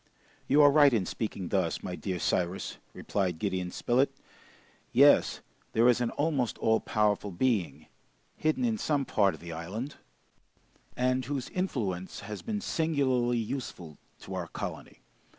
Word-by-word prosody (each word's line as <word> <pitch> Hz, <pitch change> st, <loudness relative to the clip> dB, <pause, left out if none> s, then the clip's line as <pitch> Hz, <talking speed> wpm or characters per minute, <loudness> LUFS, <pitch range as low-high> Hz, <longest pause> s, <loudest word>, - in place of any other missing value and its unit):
"You 145 Hz, +2 st, +6 dB
are 145 Hz, -, +8 dB
right 145 Hz, -1 st, +6 dB
in 105 Hz, -5 st, +2 dB
speaking 100 Hz, -4 st, -4 dB
thus, -, -, 0 dB
my 90 Hz, -, -4 dB
dear 95 Hz, -1 st, -3 dB
Cyrus," 90 Hz, +2 st, -1 dB
replied 90 Hz, -4 st, -2 dB
Gideon 95 Hz, -1 st, -2 dB
Spilett. 125 Hz, +8 st, +1 dB, 0.8 s
"Yes, -, -, +5 dB, 0.3 s
there 115 Hz, +2 st, +4 dB
is 125 Hz, 0 st, +4 dB
an 120 Hz, -, +1 dB
almost 145 Hz, -6 st, -1 dB
all 110 Hz, 0 st, +2 dB
powerful 105 Hz, -2 st, 0 dB
being, 90 Hz, -, -1 dB, 0.5 s
hidden 155 Hz, +11 st, 0 dB
in 225 Hz, -2 st, 0 dB
some 145 Hz, -3 st, 0 dB
part 100 Hz, -5 st, +2 dB
of -, -, -15 dB
the 85 Hz, -1 st, -7 dB
island, 100 Hz, -, -5 dB, 1.0 s
and 130 Hz, +1 st, +1 dB
whose 135 Hz, -1 st, -3 dB
influence 105 Hz, -, -3 dB
has 105 Hz, +1 st, -7 dB
been 210 Hz, -2 st, -3 dB
singularly 135 Hz, -, +1 dB
useful 110 Hz, -, -5 dB, 0.2 s
to 95 Hz, -, -8 dB
our 90 Hz, -2 st, -3 dB
colony. -, -, -7 dB
115 Hz, 145 wpm, -29 LUFS, 95-140 Hz, 1.0 s, are